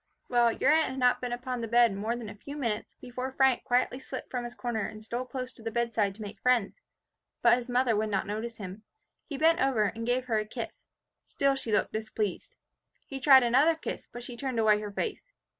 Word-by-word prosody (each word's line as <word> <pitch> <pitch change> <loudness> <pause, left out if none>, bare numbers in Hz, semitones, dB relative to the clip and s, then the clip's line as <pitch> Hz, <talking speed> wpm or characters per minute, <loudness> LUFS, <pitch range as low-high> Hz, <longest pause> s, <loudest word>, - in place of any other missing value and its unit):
"Well, 240 -1 +4
your 270 - +2
aunt 315 -1 +3
had 260 - -6
not 250 -1 +3
been 245 -1 -3
upon 250 0 -3
the 230 - -3
bed 235 -1 +4
more 215 +4 -2
than 240 -2 -6
a 205 - -7
few 280 +8 -9
minutes, 230 -7 -3
before 255 +1 -6
Frank 265 -2 +3
quietly 250 0 +1
slipped 265 0 -7
from 245 -2 -2
his 240 0 -7
corner 230 -4 -2
and 215 0 -10
stole 240 +3 -3
close 255 0 -5
to 235 - -17
the 225 - -3
bedside 225 -4 0
to 215 - -8
make 205 0 -9
friends. 250 - +1 0.6
But 245 - +6
his 245 +1 -9
mother 245 -2 +2
would 215 +1 0
not 195 -2 0
notice 220 +3 -4
him. 195 0 -8 0.5
He 285 - -5
bent 325 +3 +4
over 260 -5 +3
and 230 +3 -2
gave 250 +1 +1
her 225 -3 +1
a 215 - -2
kiss. - - -7 0.4
Still 275 0 +1
she 270 -4 -4
looked 210 - +1
displeased. 215 -2 -3 0.5
He 270 - -6
tried 265 -1 +7
another 270 +7 +4
kiss, 320 - -6
but 240 - -8
she 245 0 -8
turned 260 0 -3
away 215 -2 +4
her 210 -1 -6
face. 445 - -4
240 Hz, 225 wpm, -29 LUFS, 220-260 Hz, 0.6 s, tried